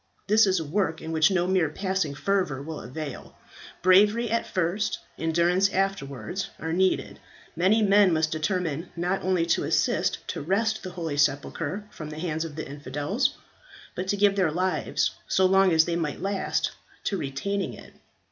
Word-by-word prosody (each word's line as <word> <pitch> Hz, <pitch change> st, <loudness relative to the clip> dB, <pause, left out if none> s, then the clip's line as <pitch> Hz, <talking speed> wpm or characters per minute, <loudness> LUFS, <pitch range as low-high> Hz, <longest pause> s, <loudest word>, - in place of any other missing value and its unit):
This 215 Hz, +1 st, +5 dB
is 190 Hz, -2 st, +2 dB
a 160 Hz, -, -4 dB
work 160 Hz, 0 st, -1 dB
in 160 Hz, -, -6 dB
which 160 Hz, -1 st, +4 dB
no 180 Hz, -3 st, +1 dB
mere 180 Hz, -4 st, +2 dB
passing 190 Hz, -3 st, -2 dB
fervour 185 Hz, -6 st, 0 dB
will 160 Hz, +1 st, -6 dB
avail; 140 Hz, +4 st, -7 dB, 0.5 s
bravery 210 Hz, +5 st, +5 dB
at 230 Hz, -, 0 dB
first, 190 Hz, +3 st, -1 dB, 0.2 s
endurance 170 Hz, +4 st, +2 dB
afterwards, 185 Hz, -, -2 dB
are 160 Hz, 0 st, -3 dB
needed. 185 Hz, +2 st, +1 dB, 0.4 s
Many 195 Hz, +6 st, +3 dB
men 200 Hz, -1 st, +5 dB
must 155 Hz, -1 st, +1 dB
determine 165 Hz, 0 st, -2 dB
not 180 Hz, +3 st, -1 dB
only 185 Hz, -3 st, +1 dB
to 170 Hz, -, +1 dB
assist -, -, 0 dB
to -, -, -3 dB
wrest 220 Hz, +7 st, 0 dB
the 185 Hz, -, -6 dB
holy 165 Hz, -5 st, -4 dB
sepulchre 145 Hz, +6 st, 0 dB
from 155 Hz, -2 st, -8 dB
the 155 Hz, -, -8 dB
hands 160 Hz, -1 st, -2 dB
of 160 Hz, -3 st, -7 dB
the 155 Hz, -, -5 dB
infidels, 145 Hz, -, -2 dB, 0.6 s
but 185 Hz, +1 st, -4 dB
to 205 Hz, -, 0 dB
give 200 Hz, 0 st, +4 dB
their 185 Hz, -5 st, +2 dB
lives, 185 Hz, +4 st, 0 dB, 0.2 s
so 190 Hz, -, +3 dB
long 190 Hz, 0 st, +5 dB
as 160 Hz, -1 st, +5 dB
they 170 Hz, -, -1 dB
might 165 Hz, -4 st, -2 dB
last, 195 Hz, 0 st, -1 dB, 0.3 s
to 200 Hz, -, -1 dB
retaining 180 Hz, +7 st, -3 dB
it. -, -, -14 dB
180 Hz, 170 wpm, -26 LUFS, 155-195 Hz, 0.6 s, This